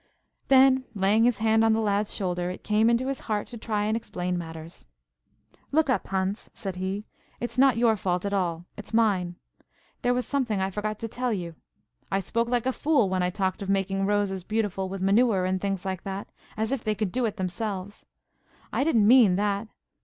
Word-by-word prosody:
Then, 265 -1 +5
laying 205 +3 +3
his 245 -3 +3
hand 220 0 +3
on 225 0 +4
the 220 - +1
lad's 210 -1 0
shoulder, 180 -2 -2
it 185 - -7
came 215 +2 +3
into 235 +2 +2
his 270 -1 -2
heart 210 -1 0
to 240 - -8
try 210 -2 -1
and 215 +1 +1
explain 180 -5 -3
matters. 165 - -7 0.8
"Look 305 -2 +3
up, - - 0
Hans," 190 +2 -2
said 195 -3 -5
he. 190 +3 -3 0.3
"It's 240 +1 -4
not 265 -3 +5
your 230 -2 +4
fault 180 -2 -1
at 200 - -2
all–it's 180 +3 -3
mine. 190 -6 +2 0.7
There 245 0 +2
was 250 - -1
something 245 -8 0
I 190 0 -1
forgot 210 +2 -3
to 225 - -2
tell 250 +2 -2
you. 175 -5 -3 0.6
I 195 - +2
spoke 230 +4 -1
like 245 -1 0
a 260 - +1
fool 285 -10 +2
when 185 -1 0
I 180 - +1
talked 185 +1 -2
of 195 - -4
making 195 0 0
roses 200 -2 0
beautiful 205 -3 -1
with 190 0 -4
manure 200 -1 +3
and 185 0 -1
things 195 -2 -2
like 190 -2 -3
that, 195 0 -5 0.3
as 220 +2 -1
if 270 -4 -2
they 215 -1 0
could 200 -2 -2
do 250 +3 0
it 215 -1 -3
themselves. 195 +1 -4 0.7
I - - +2
didn't 235 -9 +3
mean 230 -6 +7
that. 205 +2 0
205 Hz, 200 wpm, -26 LUFS, 190-230 Hz, 0.8 s, mean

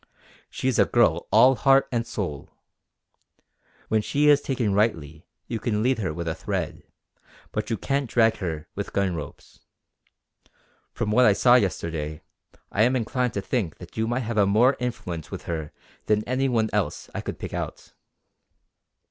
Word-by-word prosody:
She - - -3
is 130 - +1
a - - +6
girl 90 -9 +2
all 125 +5 +7
heart 135 +1 +4
and 115 -2 -1
soul. 90 -12 -5 1.4
When 110 -1 +2
she 145 +7 +2
is 145 -1 +6
taken 120 -8 -1
rightly 80 -7 -1 0.2
you 115 +3 -4
can 110 -2 -1
lead 130 0 +2
her 95 -7 -1
with 85 +2 -5
a 80 - 0
thread; - - -4 0.7
but 105 +1 -3
you 115 - -1
can't 135 +4 -1
drag 115 -1 +3
her 80 -4 -4
with 100 - -5
gun 100 -2 +1
ropes. 75 -4 -9 1.3
From 105 - -2
what 125 +3 +5
I 105 - +6
saw 120 +4 +4
yesterday, 80 -8 0 0.5
I 100 - 0
am 125 +4 +4
inclined 125 0 -1
to 100 - -1
think 95 - -2
that - - -13
you 110 0 0
might 120 +3 -1
have 110 -4 +1
more 120 +7 +4
influence 100 -10 -4
with - - -7
her 80 -3 -4 0.4
than 105 0 +2
any 130 +3 0
one 110 -3 +1
else - - -1
I - - -3
could - - -6
pick - - -7
out." - - -6
110 Hz, 170 wpm, -25 LUFS, 90-125 Hz, 1.4 s, all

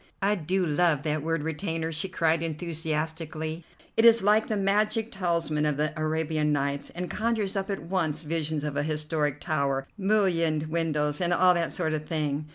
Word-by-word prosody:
"I 200 +1 +3
do 185 0 0
love 155 -2 +2
that 155 -1 -1
word 165 0 -1
'retainer,'" 160 0 -2
she 165 +4 -2
cried 165 -3 +1
enthusiastically. 160 0 -3 0.3
"It 225 - +3
is 230 -2 +7
like 210 +2 +4
the 215 - -1
magic 210 +3 +1
talisman 170 -5 0
of 150 -2 +1
the 155 +1 0
'Arabian 155 -1 0
Nights,' 140 0 -1
and 180 +1 -3
conjures 215 -2 -1
up 195 +1 -2
at 195 -3 -3
once 165 -3 -1
visions 155 -1 -2
of 150 -2 -3
a 145 - +1
historic 150 -1 -1
tower, 140 -4 -1
mullioned 180 -7 +2
windows, 150 -2 0
and 175 0 +1
all 180 +1 +5
that 170 -2 -1
sort 160 -3 0
of 155 0 -3
thing. 150 -2 -2
160 Hz, 175 wpm, -27 LUFS, 150-180 Hz, 0.3 s, is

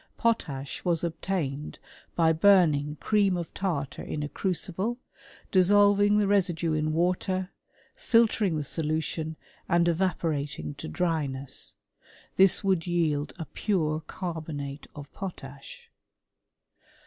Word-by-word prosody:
Potash 145 - -1
was 170 -2 0
obtained 160 -4 -3 0.4
by 165 -1 +4
burning 155 -5 +4
cream 200 -4 +2
of 170 -2 -5
tar* 170 -8 -1
t^ 140 - -10
in 150 - -4
a - - -2
crucible, 190 +6 -2 0.5
dissolving 205 +2 +5
the 210 - +3
residue 175 -5 +1
in 155 0 0
water, 185 +3 0 0.4
filter 230 -2 +3
^ 175 -5 0
the 150 - -2
solution, 160 +1 -2 0.3
and 170 0 +3
evaporating 155 - -1
to - - -8
dryness, 140 - -2 0.6
f - - -43
This 190 -1 +5
^^d 185 -3 +1
yield 155 -4 0
a 165 - -5
pure 155 -7 -1
carbonate 155 -5 -5
of 145 -1 -8
potash. 140 -8 -9
170 Hz, 120 wpm, -27 LUFS, 150-190 Hz, 0.6 s, dissolving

